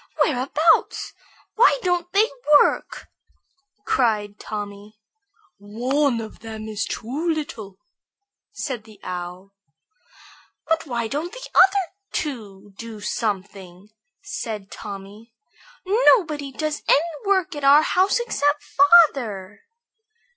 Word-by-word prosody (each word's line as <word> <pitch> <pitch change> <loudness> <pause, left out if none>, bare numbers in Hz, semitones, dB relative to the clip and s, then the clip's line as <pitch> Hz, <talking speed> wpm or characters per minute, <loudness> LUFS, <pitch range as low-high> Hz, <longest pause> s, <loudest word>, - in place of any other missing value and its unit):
Whereabouts? 300 +4 +1 0.4
Why 480 +2 +5
don't 355 -1 -1
they 410 +4 +4 0.3
work?" - - 0 0.8
cried 210 -4 0
Tommy. 205 0 -7 0.6
"One 245 +6 0
of 220 -1 -8
them 220 -1 -8
is 215 0 -3
too 280 +9 -4
little," 230 - -4 0.7
said 260 - -5
the 215 -3 -16
Owl. 180 +2 -7 1.1
"But 325 0 0
why 235 -3 -2
don't 300 +8 -4
the - - -9
other 385 -1 +4 0.2
two 205 -8 -5
do 230 -2 -8
something?" 195 -3 -4 0.3
said 210 -4 -6
Tommy. 205 +3 -10 0.5
"Nobody 355 - +3
does 305 +2 -3
any 330 +2 +3
work 375 -3 +1
at 290 - -6
our 285 +2 +7
house 375 +7 +2
except 290 -11 0
father." 270 - +3
245 Hz, 105 wpm, -22 LUFS, 210-325 Hz, 1.1 s, our